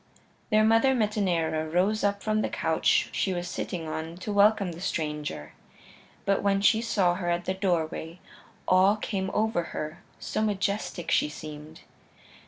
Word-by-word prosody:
Their 215 Hz, -1 st, +4 dB
mother, 225 Hz, +4 st, +4 dB
Metaneira, 175 Hz, -8 st, 0 dB
rose 190 Hz, +6 st, +1 dB
up 200 Hz, 0 st, 0 dB
from 215 Hz, 0 st, +1 dB
the -, -, -1 dB
couch 160 Hz, 0 st, +1 dB
she 190 Hz, -, 0 dB
was 175 Hz, 0 st, -3 dB
sitting 170 Hz, -2 st, -4 dB
on 160 Hz, +2 st, -5 dB
to 205 Hz, +3 st, -4 dB
welcome 205 Hz, -2 st, +4 dB
the 170 Hz, +1 st, -9 dB
stranger. 150 Hz, -, -3 dB, 0.7 s
But 195 Hz, 0 st, +2 dB
when 200 Hz, -1 st, +2 dB
she 220 Hz, +2 st, +4 dB
saw 195 Hz, -6 st, +2 dB
her 175 Hz, -1 st, -3 dB
at 175 Hz, 0 st, -1 dB
the 185 Hz, -, 0 dB
doorway, 170 Hz, -3 st, -2 dB, 0.5 s
awe 185 Hz, +3 st, +5 dB
came 195 Hz, -3 st, -3 dB
over 220 Hz, -4 st, +1 dB, 0.2 s
her, 155 Hz, +2 st, -5 dB, 0.2 s
so -, -, -3 dB
majestic 200 Hz, -4 st, -1 dB
she -, -, +3 dB
seemed. 150 Hz, +1 st, -9 dB
185 Hz, 155 wpm, -27 LUFS, 165-210 Hz, 0.7 s, awe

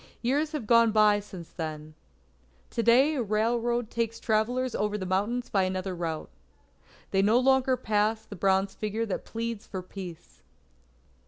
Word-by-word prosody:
Years 290 Hz, +6 st, +1 dB
have 290 Hz, -7 st, -3 dB
gone 230 Hz, 0 st, +5 dB
by 210 Hz, -1 st, +5 dB
since 190 Hz, -5 st, -10 dB
then. 155 Hz, -2 st, -6 dB, 0.8 s
To -, -, -1 dB
day 255 Hz, +6 st, +5 dB
a 275 Hz, -, -1 dB
railroad 235 Hz, +2 st, 0 dB
takes 230 Hz, -1 st, -2 dB
travellers 245 Hz, +3 st, 0 dB
over 210 Hz, 0 st, -1 dB
the 190 Hz, -, -4 dB
mountains 205 Hz, +7 st, -1 dB
by 195 Hz, -, +3 dB
another 185 Hz, 0 st, -2 dB
route. 165 Hz, -, -4 dB, 0.8 s
They 195 Hz, -, +3 dB
no 215 Hz, +4 st, +4 dB
longer 260 Hz, 0 st, +3 dB
pass 215 Hz, -1 st, 0 dB
the 205 Hz, -, -9 dB
bronze 195 Hz, +1 st, +1 dB
figure 215 Hz, +2 st, -2 dB
that 205 Hz, -, -4 dB
pleads 230 Hz, -1 st, -5 dB
for 185 Hz, -2 st, -5 dB
Peace. 180 Hz, -3 st, -10 dB
215 Hz, 155 wpm, -28 LUFS, 195-235 Hz, 0.8 s, gone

